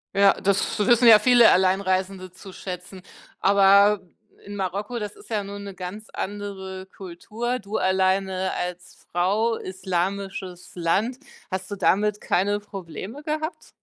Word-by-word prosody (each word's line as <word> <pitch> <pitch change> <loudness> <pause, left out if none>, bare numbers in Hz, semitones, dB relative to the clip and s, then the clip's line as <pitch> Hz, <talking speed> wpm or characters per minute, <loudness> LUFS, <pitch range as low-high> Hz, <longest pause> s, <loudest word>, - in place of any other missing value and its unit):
Ja 200 0 +6
das 200 +3 0
wissen 235 +3 +5
ja 215 -2 +10
viele 240 0 +6
Alleinreisende 185 0 +1
zu 190 +1 -12
schätzen, 180 0 -8 0.4
aber 200 +1 +5 0.5
in 205 0 -8
Marokko, 200 +5 -3
das 210 -1 -5
ist - - -16
ja 210 -3 -1
nun 200 0 -7
'ne 200 -2 -8
ganz 190 +4 -7
andere 190 -2 -5
Kultur, 220 +7 -4
du 205 +1 -4
alleine 190 0 +1
als 180 +1 -5 0.2
Frau, 205 +6 +1
islamisches 190 0 -4
Land, 200 +9 0 0.3
hast 185 0 -4
du 205 - -4
damit 205 +2 +1
keine 205 +3 +1
Probleme 195 - -8
gehabt? 310 +2 -4
195 Hz, 135 wpm, -24 LUFS, 185-210 Hz, 0.5 s, ja